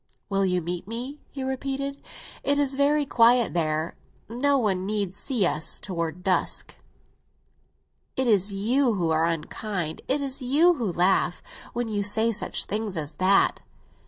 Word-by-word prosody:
"Will 195 -1 +1
you 180 -2 0
meet 175 +2 -3
me?" 250 +6 -5
he 270 - -6
repeated. 275 +1 -3 0.4
"It 285 0 +2
is 280 -2 +2
very 285 +2 +2
quiet 240 -1 +4
there; 160 -1 -1 0.3
no 275 +5 +1
one 195 -7 0
need 200 -2 -1
see 215 0 0
us—toward 170 +1 -2
dusk?" 185 -1 0 1.4
"It 260 - +1
is 205 -4 +3
you 230 +5 +1
who 170 -4 0
are 160 +1 +3
unkind, 170 +1 -3
it 275 +3 +1
is 275 0 -3
you 300 +8 +4
who 235 - -2
laugh, 175 0 +1 0.3
when 240 0 -2
you 210 -2 -1
say 220 +3 +2
such 215 - -1
things 210 -3 -3
as 150 -1 -4
that." 190 +2 +3
215 Hz, 150 wpm, -26 LUFS, 180-265 Hz, 1.4 s, quiet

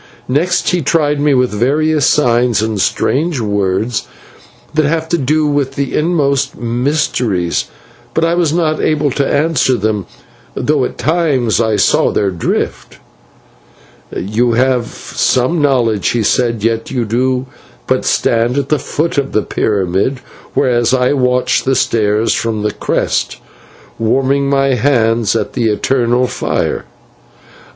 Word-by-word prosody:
Next 160 +8 +1
he 180 -1 0
tried 150 -1 +1
me 145 -1 +2
with 125 -1 +2
various 145 +6 +1
signs 120 -5 +2
and 110 -3 -1
strange 155 - 0
words 100 - -1 0.7
that 155 -1 +2
have 160 +2 -1
to 170 - +1
do 150 +3 +1
with 145 -2 -1
the 140 -1 -2
inmost 140 -4 0
mysteries, 120 - -1 0.5
but 165 - +2
I 165 - +1
was 170 -3 +1
not 160 -2 0
able 150 -2 +1
to 140 +2 -1
answer 145 -4 +2
them, 105 -3 -2 0.5
though 145 -3 +1
at - - -6
times 145 -9 +1
I 110 -2 +1
saw - - +2
their 100 -2 0
drift. 85 -3 -3 1.1
"'You 115 +5 0
have 125 0 +1
some 130 +6 -1
knowledge,' 120 -8 +1
he 120 -2 0
said, 115 -1 0
'yet 115 0 -1
you 125 -3 -2
do 125 +3 0 0.4
but - - 0
stand 115 +3 +1
at 140 -1 -1
the 150 - +1
foot 155 +3 -1
of 140 -1 -4
the 110 - +1
pyramid, 100 +5 -1 0.4
whereas 120 0 +2
I 125 +1 +2
watch 125 -2 +1
the 135 0 +1
stars 110 -2 +1
from 110 -2 -2
its 105 - -1
crest, - - -1 0.6
warming 135 +4 +1
my 135 -1 +2
hands 115 -4 +1
at - - -2
the 120 -3 -1
eternal 120 +3 +1
fire.' - - -2
125 Hz, 140 wpm, -14 LUFS, 115-145 Hz, 1.1 s, me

